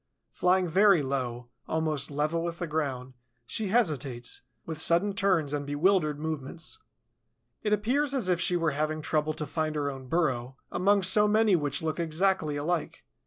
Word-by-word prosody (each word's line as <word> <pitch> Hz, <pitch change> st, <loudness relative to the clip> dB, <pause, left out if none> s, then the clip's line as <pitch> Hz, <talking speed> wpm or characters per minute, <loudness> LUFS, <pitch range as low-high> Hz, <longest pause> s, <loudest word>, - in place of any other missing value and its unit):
Flying 180 Hz, 0 st, +2 dB
very 190 Hz, -1 st, +5 dB
low, 125 Hz, -3 st, -3 dB, 0.2 s
almost 155 Hz, -3 st, -1 dB
level 150 Hz, +3 st, -1 dB
with 170 Hz, 0 st, -3 dB
the 175 Hz, -, -3 dB
ground, 135 Hz, -5 st, -3 dB, 0.3 s
she 210 Hz, -, -2 dB
hesitates, 145 Hz, -, -1 dB, 0.2 s
with 160 Hz, -1 st, -4 dB
sudden 175 Hz, +6 st, +3 dB
turns 180 Hz, -7 st, +1 dB
and 145 Hz, -1 st, -1 dB
bewildered 150 Hz, +1 st, +1 dB
movements. 160 Hz, -, -5 dB, 0.8 s
It 210 Hz, -, -1 dB
appears 250 Hz, +8 st, +1 dB
as 245 Hz, -8 st, 0 dB
if 180 Hz, -1 st, +1 dB
she 175 Hz, 0 st, +2 dB
were 165 Hz, -2 st, +1 dB
having 155 Hz, +2 st, -2 dB
trouble 155 Hz, 0 st, 0 dB
to 150 Hz, -, -3 dB
find 155 Hz, +1 st, -2 dB
her 145 Hz, -1 st, -1 dB
own 135 Hz, -1 st, -9 dB
burrow 130 Hz, -5 st, -1 dB
among 200 Hz, +1 st, +2 dB
so 210 Hz, +3 st, +4 dB
many 215 Hz, -1 st, +4 dB
which 145 Hz, -2 st, -1 dB
look 160 Hz, +1 st, -2 dB
exactly 165 Hz, -1 st, +1 dB
alike. 155 Hz, +3 st, -2 dB
160 Hz, 165 wpm, -28 LUFS, 145-185 Hz, 0.8 s, very